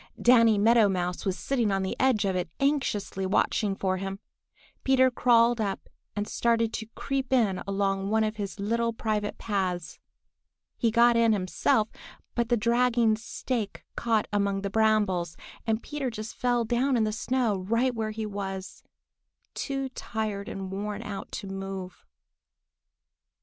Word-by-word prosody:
Danny 230 -3 +6
Meadow 220 0 +5
Mouse 180 -1 -2
was 190 0 0
sitting 240 -6 0
on 195 0 0
the 190 - -2
edge 255 -6 +3
of 190 -1 0
it 180 -2 -2
anxiously 270 -9 0
watching 195 +1 +1
for 185 -1 0
him. 195 +1 -4 0.7
Peter 260 -1 +4
crawled 240 -1 +4
up 200 -2 -3 0.3
and 205 0 -2
started 230 -1 +1
to 220 - -4
creep 270 -2 -2
in 220 -8 +2
along 195 0 0
one 220 +1 +3
of 215 0 -2
his 200 -1 -5
little 230 +3 0
private 215 -2 -2
paths. 185 -5 -2 0.8
He 235 - +1
got 235 +1 +5
in 230 -1 +4
himself, 205 +2 +1 0.5
but 235 -1 0
the 240 - +3
dragging 235 0 +3
stake 225 0 -4
caught 225 -2 +1
among 200 -1 +1
the 200 - -2
brambles, 205 -6 +2 0.3
and 220 0 0
Peter 295 -3 -3
just 215 -1 -6
fell 245 -1 +1
down 245 +3 +1
in 225 - +2
the 215 - 0
snow 235 -1 0
right 230 +7 +1
where 220 -2 -2
he 215 0 -4
was, 195 -2 -5 0.7
too 270 -1 -2
tired 215 -5 -4
and 190 -1 -5
worn 205 +2 -4
out 200 -3 -6
to - - -5
move. 195 -1 -6
215 Hz, 155 wpm, -27 LUFS, 195-235 Hz, 0.8 s, Danny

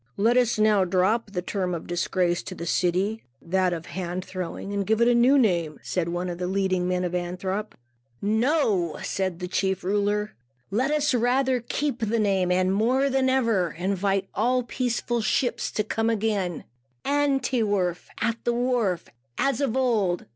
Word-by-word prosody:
"Let 230 +4 +3
us 245 -2 +3
now 215 -2 +4
drop 190 +5 +1
the 180 -3 -4
term 185 -2 -2
of 165 - -6
disgrace 175 0 0
to - - -8
the 170 - -6
city 185 +6 0 0.2
that 185 +1 0
of 165 -2 -3
the - - -14
Hand 185 0 -4
Throwing 185 +2 -5
and 200 0 0
give 220 +2 +1
it 235 - +4
a 245 - +5
new 245 +4 +5
name," 170 - +1
said 175 -2 -1
one 175 +1 -2
of 175 -1 -5
the 180 - -2
leading 185 -1 0
men 180 0 0
of 180 -1 -2
Antwerp. 185 +4 -3 0.4
"No," 220 - +1
said 190 -3 -2
the 180 0 -5
chief 190 +1 -1
ruler, 205 +2 0 0.4
"let 250 +7 +1
us 300 -1 +1
rather 250 +2 +2
keep 270 +2 -2
the 225 0 0
name, 195 -4 +1
and, 185 +1 +2
more 255 +7 +2
than 265 0 +2
ever, 230 -10 +1
invite 195 +1 0
all 250 +4 +1
peaceful 240 -1 -1
ships 235 +2 0
to 215 - -1
come 225 +1 -1
again, 205 -6 -1 0.4
'an 285 -1 +2
't 250 -1 0
werf' 185 -4 -1
(at 230 0 -1
the 240 - +1
wharf), 235 -8 0 0.3
as 275 +2 +1
of 265 -3 0
old. 215 -9 +1
205 Hz, 180 wpm, -25 LUFS, 180-240 Hz, 0.4 s, a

